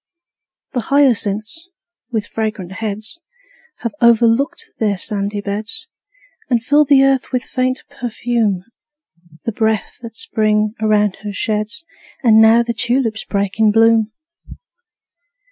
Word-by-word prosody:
The 250 - -1
hyacinths, 255 - +1 0.4
with 220 -3 -1
fragrant 215 -5 -4
heads, 215 - -5 0.6
Have 235 - -3
overflowed 235 +6 +4 0.2
their 210 -3 +1
sandy 205 +1 -2
beds, 210 - -4 0.6
And 235 -3 +1
fill 295 +5 +4
the 275 -1 +5
earth 270 -1 +1
with 255 -2 -1
faint 255 0 -2
perfume, 230 -5 -2 0.8
The 230 - -2
breath 220 0 -1
that 230 -1 -9
Spring 215 -6 +1
around 210 -2 +2
her 205 0 -7
sheds. 215 +9 -3 0.4
And 220 -2 +6
now 225 +2 +6
the 235 0 -2
tulips 230 0 0
break 200 +1 -2
in 220 -1 +5
bloom! 225 0 +4
225 Hz, 120 wpm, -18 LUFS, 210-245 Hz, 0.8 s, And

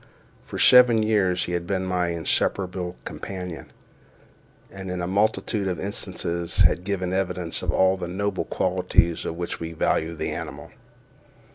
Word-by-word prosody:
For - - -6
seven 125 -3 +7
years 100 -5 +2
he - - -5
had 85 0 -2
been 95 -1 -1
my 90 -1 0
inseparable 90 +2 -1
companion, 90 -4 -6 1.0
and 95 -1 -7
in 90 0 -3
a 85 - -2
multitude 100 +1 0
of 90 -3 -2
instances 85 -3 -2
had 90 - +4
given 95 -2 -2
evidence 90 -3 -2
of - - -4
all 95 0 +3
the 90 -2 -5
noble 100 +3 -2
qualities 90 -2 +1
for - - -3
which 85 +1 -5
we 80 0 -5
value 80 +1 0
the - - -3
animal. - - -7
90 Hz, 150 wpm, -24 LUFS, 85-95 Hz, 1.0 s, seven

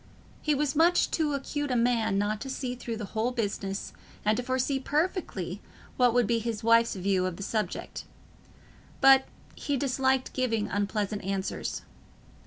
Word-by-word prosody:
He 300 -2 +1
was 285 0 0
much 335 +3 +4
too 300 -3 +1
acute 290 +1 -3
a 250 - 0
man 230 -4 +2
not 210 +1 0
to 270 - -5
see 260 -1 -3
through 235 -2 -5
the 215 - -4
whole 225 +2 +1
business, 200 -4 -3 0.3
and 215 +1 +4
to 245 - -1
foresee 260 +2 0
perfectly 325 +7 -2 0.3
what 250 -1 +4
would 245 -1 +4
be 230 +2 +1
his 225 -1 -4
wife's 230 0 +4
view 185 -1 +1
of 185 - -4
the 200 - -6
subject; 210 -2 -3 0.9
but 270 0 +7 0.3
he 285 -1 -2
disliked 265 0 +1
giving 230 -5 0
unpleasant 205 0 -2
answers. 195 0 -3
240 Hz, 160 wpm, -28 LUFS, 210-270 Hz, 0.9 s, but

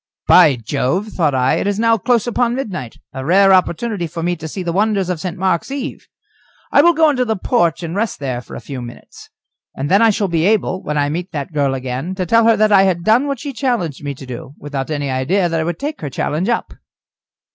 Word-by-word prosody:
"By 145 - +6
Jove!" 130 - -2
thought 155 -9 0
I, 130 0 +2
"it - - -1
is 205 -1 0
now 230 +1 +3
close 235 +2 +1
upon 240 0 0
midnight, 185 - -5 0.2
a 130 0 -5
rare 195 +6 +5
opportunity 185 +1 0
for 165 +1 -6
me 175 +1 0
to 160 - -7
see 185 +4 -5
the 170 -1 -2
wonders 200 -1 +1
of 175 - -3
St. 180 0 -5
Mark's 185 +2 0
eve. 275 0 -6 0.6
I - - +6
will 345 +2 +4
go 315 -1 +4
into 255 -3 0
the 220 -2 -1
porch 175 - 0
and 165 +1 -4
rest 220 +2 -1
there 130 -3 -3
for - - -11
a - - -7
few 135 -3 -7
minutes, 120 0 -12 0.5
and 140 +4 -3
then 200 +3 +5
I 230 - +6
shall 205 -1 0
be 170 0 +1
able, 200 -3 +1
when 150 0 -3
I 145 0 +1
meet 175 +5 -4
that 150 +2 -5
girl 140 -2 +1
again, 130 +7 -4
to 185 -1 -2
tell 230 +5 +3
her 225 -1 +4
that 215 +1 +3
I 195 -2 +7
had 185 -3 +1
done 230 +8 +3
what 275 -3 -3
she 285 +1 -6
challenged 230 - -2
me 140 -1 -4
to 135 - -11
do, 125 +3 -8
without 140 -1 -5
any 145 -3 -2
idea 175 +9 +1
that 165 -1 -1
I - - 0
would 170 0 -3
take 295 - -5
her 145 - -4
challenge 155 - -2
up." 235 - -1
180 Hz, 245 wpm, -18 LUFS, 145-220 Hz, 0.6 s, I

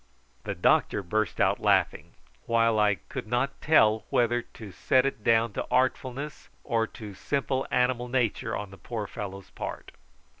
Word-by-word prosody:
The - - -3
doctor 100 - +2
burst 110 +3 -1
out - - +3
laughing, - - +1 0.3
while 115 -1 +3
I 105 -1 +4
could 95 - -8
not 125 +4 -1
tell 110 -8 +4
whether 120 0 +2
to 110 -3 -12
set 130 +7 +2
it 135 -6 -3
down 115 -1 +3
to - - -4
artfulness 130 +3 -1
or 115 -3 0
to 105 -3 -10
simple 135 +5 -2
animal 125 -1 +1
nature 125 -3 -1
on 105 -2 -7
the 95 - -13
poor 115 -3 -4
fellow's 100 -3 -7
part. - - -7
115 Hz, 155 wpm, -27 LUFS, 105-125 Hz, 0.3 s, I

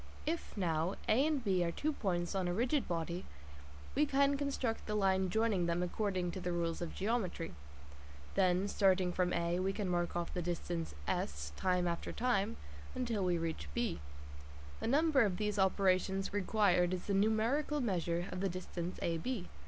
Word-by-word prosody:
If, 325 -7 -3
now, 170 -1 0
A 265 +7 +4
and 295 -5 0
B 190 -4 +2
are 170 - 0
two 305 - -1
points 175 -7 -1
on 190 -2 0
a 175 - 0
rigid 250 +6 +1
body, 170 +1 -2 0.7
we 300 +1 +3
can 280 0 +3
construct 275 -5 -2
the 210 - -1
line 190 -2 +2
joining 210 -3 +2
them 170 +1 +1
according 185 -1 -1
to 190 - -5
the 180 -1 -2
rules 170 -1 -1
of 170 - -4
geometry; 195 - -1 0.8
then, 185 0 +3
starting 190 -3 +3
from 180 0 +1
A, 170 +1 0
we 190 +1 +1
can 200 0 -2
mark 175 -1 0
off 175 -1 -2
the 180 - -1
distance 170 -1 -3
S 75 +1 -2
time 180 - +1
after 170 -1 -2
time 225 -3 0 0.4
until 235 -6 -1
we 180 -1 +2
reach 160 - -3
B. 85 - 0 0.8
The - - -2
number 290 +2 +4
of 200 -5 +2
these 210 -1 -1
operations 190 0 +2
required 185 -3 +3
is 180 - -7
the 200 - 0
numerical 225 +9 +2
measure 175 - 0
of 180 - -4
the 195 +1 +1
distance 180 0 -5
AB. 175 +5 -2
190 Hz, 175 wpm, -35 LUFS, 175-220 Hz, 0.8 s, A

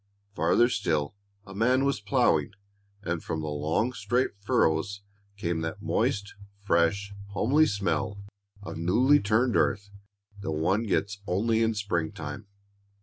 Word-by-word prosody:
Farther 90 +7 +3
still, 85 -10 -1 0.3
a 95 - -10
man 125 +6 +2
was 140 -7 0
plowing, 100 - +2 0.5
and 85 -3 -3
from 80 - -3
the 75 - -4
long 80 +12 0
straight 120 +4 0
furrows 100 -3 +1 0.4
came 85 -4 -2
that 80 0 -5
moist, 100 0 0 0.3
fresh, 100 +1 +1 0.2
homely 145 +10 +3
smell 100 -1 -1 0.5
of 100 - -6
newly 125 - +4
turned 110 +4 +1
earth 100 0 +1 0.5
that 100 -5 -4
one 95 +9 0
gets 100 +1 -1
only 110 +5 +1
in 115 -1 +1
springtime. 85 -2 -3
100 Hz, 130 wpm, -27 LUFS, 85-115 Hz, 0.5 s, newly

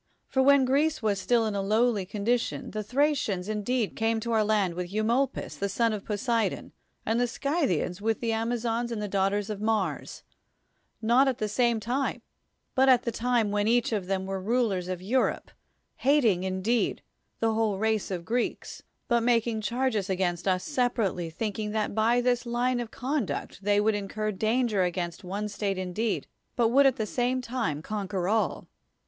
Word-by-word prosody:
For 265 - +1
when 275 0 +5
Greece 290 +2 +1
was 200 -3 +1
still 235 +2 +2
in 215 - -1
a 200 - -1
lowly 215 -1 +1
condition, 225 +4 -1
the 215 - -3
Thracians 250 -6 0
indeed 215 +2 -1
came 225 0 +1
to 235 +1 -3
our 220 -1 +3
land 205 -4 +1
with 175 +1 -5
Eumolpus 230 +6 0
the 200 - -1
son 230 +3 +1
of 205 -2 -4
Poseidon, 225 +2 -1 0.3
and 225 +2 +1
the 245 - +2
Scythians 230 - -1
with 225 +1 0
the 230 -1 -1
Amazons 230 +1 -1
the 210 -3 -3
daughters 200 +1 0
of 205 -1 -5
Mars, 215 -2 -1 0.8
not 245 +5 +4
at 260 -2 0
the 215 - -1
same 235 +1 +1
time, 250 +6 -2 0.5
but 265 +1 +4
at 255 -2 +5
the 235 - -1
time 230 -2 +1
when 205 0 +1
each 240 +1 +2
of 200 -5 -2
them 190 0 -1
were 195 0 -3
rulers 210 -4 0
of 185 -1 -4
Europe, 250 +7 0 0.5
hating, 255 -10 +3
indeed, 190 +5 0 0.4
the 225 -1 +1
whole 220 -3 +1
race 220 0 0
of 180 -3 -3
the - - -19
Greeks, 240 +2 -2 0.3
but 235 -2 +3
making 230 -1 +1
charges 235 -3 -1
against 180 -1 -1
us 185 -1 +1
sepa 250 -4 0
rately, 170 -2 -5
thinking 210 +3 -3
that 215 -2 -1
by 225 +3 +3
this 245 0 0
line 245 +1 0
of 240 -2 -4
conduct 245 - -3
they 205 0 +3
would 215 +1 +3
incur 215 +1 -2
danger 220 +1 +1
against 175 -1 -2
one 200 +3 -3
state 200 -1 -2
indeed, 185 +4 -2 0.3
but 235 -3 +3
would 275 +3 +6
at 265 - +2
the 220 - -2
same 245 +4 0
time 230 - -3
conquer 195 -3 -3
all. 220 +2 0
220 Hz, 180 wpm, -27 LUFS, 200-245 Hz, 0.8 s, would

